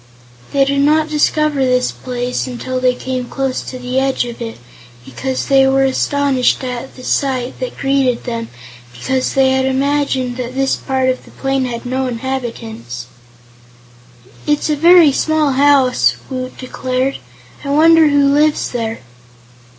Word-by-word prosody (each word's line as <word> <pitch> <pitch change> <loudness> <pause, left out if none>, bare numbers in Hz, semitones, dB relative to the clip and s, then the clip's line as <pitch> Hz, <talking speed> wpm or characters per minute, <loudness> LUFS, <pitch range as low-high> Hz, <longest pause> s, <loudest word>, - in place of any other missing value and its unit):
They 275 -1 +3
did 280 0 0
not 310 +2 +3
discover 300 -1 +1
this 250 -1 +1
place 250 0 -4
until 255 +1 -4
they 255 0 +2
came 255 0 -4
close 265 +1 -2
to 255 - -7
the 250 +1 -2
edge 265 -2 0
of 240 0 -8
it, 230 -1 -5 0.5
and 130 - -13 0.3
they 270 -1 +5
were 270 0 +3
astonished 270 -1 +1
at 250 0 -5
the 255 - -12
sight 260 -2 -1
that - - -5
greeted 270 -3 +1
them 230 -2 -4 0.5
because 255 - -2
they 265 -1 +4
had 265 0 +1
imagined 265 -2 0
that 250 0 -5
this 270 0 +1
part 265 -1 -1
of 255 - -2
the - - -17
plain 270 -1 -1
had 235 -1 -5
no 260 +1 -1
inhabitants. 230 - -5 1.4
"It's 295 +1 +1
a - - +2
very 335 0 +6
small 310 +1 +1
house," 270 -2 +3 0.2
Woot 255 0 -5
declared. 255 +1 -2 0.4
"I 280 - -5
wonder 320 +2 +5
who 285 -1 +3
lives 300 +1 +2
there?" 230 -2 -3
265 Hz, 150 wpm, -16 LUFS, 250-280 Hz, 1.4 s, very